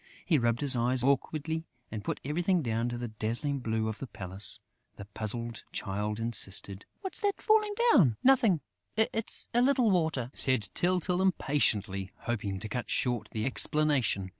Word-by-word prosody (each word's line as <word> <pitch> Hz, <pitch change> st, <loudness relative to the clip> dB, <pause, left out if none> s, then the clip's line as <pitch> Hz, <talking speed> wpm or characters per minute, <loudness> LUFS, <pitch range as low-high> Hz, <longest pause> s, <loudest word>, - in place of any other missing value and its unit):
He 160 Hz, -6 st, +3 dB
rubbed 120 Hz, +1 st, 0 dB
his 140 Hz, -2 st, +4 dB
eyes 125 Hz, +1 st, +1 dB
awkwardly 155 Hz, +4 st, 0 dB, 0.2 s
and 105 Hz, -2 st, -5 dB
put -, -, -3 dB
everything 175 Hz, +4 st, +1 dB
down 115 Hz, 0 st, -1 dB
to 120 Hz, -, -4 dB
the 120 Hz, -1 st, -5 dB
dazzling 115 Hz, +6 st, -1 dB
blue 110 Hz, -2 st, -1 dB
of 110 Hz, -1 st, -4 dB
the 135 Hz, -, -6 dB
palace. 95 Hz, -1 st, -3 dB, 0.4 s
The 100 Hz, -, -9 dB
puzzled 115 Hz, +3 st, -4 dB
Child 105 Hz, +2 st, -3 dB
insisted: 100 Hz, -3 st, -1 dB, 0.2 s
"What's 380 Hz, -2 st, -3 dB
that 405 Hz, -2 st, -1 dB
falling 425 Hz, -2 st, +2 dB, 0.2 s
down?" 130 Hz, -, +5 dB
"Nothing; 240 Hz, -, +4 dB, 0.4 s
it's 220 Hz, 0 st, 0 dB
a 240 Hz, -, +3 dB
little 255 Hz, -4 st, +3 dB
water," 160 Hz, -9 st, 0 dB
said 130 Hz, -6 st, +4 dB
Tyltyl, 180 Hz, 0 st, +1 dB
impatiently, 110 Hz, -, +1 dB
hoping 105 Hz, -5 st, -3 dB
to 110 Hz, -, -5 dB
cut 120 Hz, +3 st, -4 dB
short 120 Hz, -4 st, -1 dB
the 110 Hz, 0 st, -2 dB
explanation. 135 Hz, -8 st, +2 dB
125 Hz, 160 wpm, -30 LUFS, 110-165 Hz, 0.4 s, down